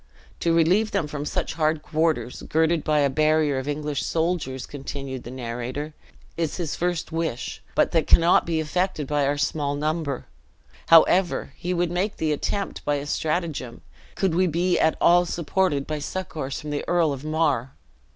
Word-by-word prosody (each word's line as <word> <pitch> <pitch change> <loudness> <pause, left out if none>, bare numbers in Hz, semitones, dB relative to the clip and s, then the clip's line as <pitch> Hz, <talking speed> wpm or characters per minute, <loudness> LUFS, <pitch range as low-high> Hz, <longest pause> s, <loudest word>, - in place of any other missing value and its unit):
"To 170 - +1
relieve 175 +7 +3
them 165 - 0
from 150 -1 -5
such - - -2
hard 155 -1 0
quarters, 160 -5 -1
girded 160 0 +2
by 150 -1 +2
a 140 - +4
barrier 155 -1 +2
of 130 - -6
English 150 -1 -2
soldiers," 160 -6 -1
continued 135 -2 -6
the - - -8
narrator, 125 +4 -5 0.4
"is 165 -3 -2
his 165 -4 -3
first 175 -2 -2
wish: 160 -6 -3
but - - +3
that 165 -3 +1
cannot 170 +1 +5
be 165 -1 0
effected 160 0 -1
by 145 0 +1
our 145 +1 0
small 145 -1 -1
number. 150 -2 -2 0.6
However, 170 +2 +4
he 180 - -4
would 175 -1 0
make 185 +4 -1
the 155 -1 0
attempt 200 +7 -2
by 145 - +1
a 140 0 -3
strategem, 155 -5 -2 0.3
could 190 -4 +1
we 185 +2 +3
be 175 +2 +1
at 160 - +2
all 175 +1 +5
supported 170 -3 0
by 155 -1 -3
succors 150 -4 -4
from 150 - -6
the 145 - -2
Earl 170 -4 +2
of 135 0 -7
Mar!" 155 -5 0
155 Hz, 170 wpm, -24 LUFS, 145-170 Hz, 0.6 s, cannot